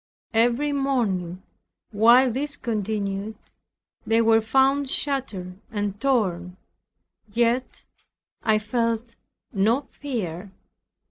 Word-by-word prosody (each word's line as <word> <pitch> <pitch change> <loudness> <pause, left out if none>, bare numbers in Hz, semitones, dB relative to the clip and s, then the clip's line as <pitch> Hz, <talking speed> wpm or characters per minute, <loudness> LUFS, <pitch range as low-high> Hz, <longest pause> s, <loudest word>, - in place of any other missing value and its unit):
Every 240 +6 +2
morning 205 -11 -1 0.5
while 235 +4 +6
this 285 +4 -2
continued, 210 -2 -3 0.7
they 225 +1 +2
were 225 -1 +4
found 270 +4 +2
shattered 210 -12 -3
and 205 -2 -3
torn, 185 -9 0 0.7
yet 235 +3 0 0.6
I 220 -1 +3
felt 230 +1 -2 0.4
no 220 +6 +2
fear. 200 - -5
225 Hz, 85 wpm, -24 LUFS, 200-255 Hz, 0.7 s, while